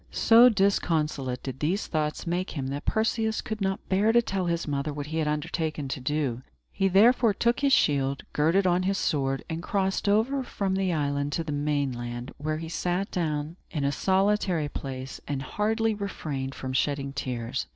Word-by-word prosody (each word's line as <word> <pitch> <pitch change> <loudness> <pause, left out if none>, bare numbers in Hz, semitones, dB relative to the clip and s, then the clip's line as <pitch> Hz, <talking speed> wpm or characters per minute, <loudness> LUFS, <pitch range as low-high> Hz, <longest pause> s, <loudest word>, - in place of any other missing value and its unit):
So 235 +2 +6
disconsolate 155 - 0
did 130 -1 -5
these 180 +8 0
thoughts 155 -2 -2
make 175 +2 -1
him, 135 - -2
that 140 +3 -5
Perseus 220 0 +1
could 215 -1 -5
not 195 0 -2
bear 200 +4 +3
to 235 - +5
tell 190 -4 -2
his 170 -1 -1
mother 145 +1 -1
what 145 0 -5
he 160 +2 -3
had 155 - 0
undertaken 150 0 -2
to 135 - -3
do. 130 -2 -1 0.3
He 195 -1 +1
therefore 220 +3 +5
took 235 +1 +1
his 280 -1 +2
shield, 140 - +2
girded 165 +6 +3
on 180 0 +3
his 195 +1 0
sword, 135 -6 0
and 165 -1 -4
crossed 195 +2 0
over 230 +7 +2
from 200 -6 -2
the 190 -1 +1
island 145 -2 -1
to 165 - -1
the 155 - -5
mainland, 135 -5 -2
where 155 +1 -2
he 165 +1 -6
sat 180 +4 -2
down 155 -2 -2
in 150 -4 -3
a 140 - +2
solitary 190 -2 +1
place, 130 -1 -6
and 140 -2 -2
hardly 220 - 0
refrained 150 -10 -4
from 130 -1 -5
shedding 140 0 0
tears. 125 -1 -3
160 Hz, 180 wpm, -27 LUFS, 140-195 Hz, 0.3 s, So